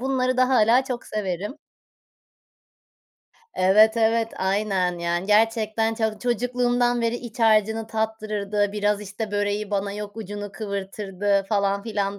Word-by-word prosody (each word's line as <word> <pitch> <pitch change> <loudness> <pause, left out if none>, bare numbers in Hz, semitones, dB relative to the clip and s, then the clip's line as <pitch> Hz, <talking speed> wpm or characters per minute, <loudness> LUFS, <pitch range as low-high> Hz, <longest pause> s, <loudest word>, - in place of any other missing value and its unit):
Bunları 255 -1 0
da 255 0 +3
hâlâ 245 +1 +4
çok 250 -2 -5
severim. 205 +2 -3 2.0
Evet, 215 +5 +5
evet 225 0 +2
aynen. 190 -2 0
Yani, 170 +2 -2
gerçekten 220 +1 +2
çok 220 -2 -2
çocukluğumdan 245 0 +1
beri 230 0 0
iç 240 -1 -10
harcını 220 0 +3
tattırırdı, 215 -2 -2
biraz 205 0 0
işte, 210 +2 -6
böreği 205 0 -1
bana 200 0 -1
yok 210 0 -7
ucunu 205 -1 -6
kıvırtırdı 200 -1 -2
falan 200 -1 +1
filan 200 -3 -2
215 Hz, 125 wpm, -24 LUFS, 200-225 Hz, 2.0 s, Evet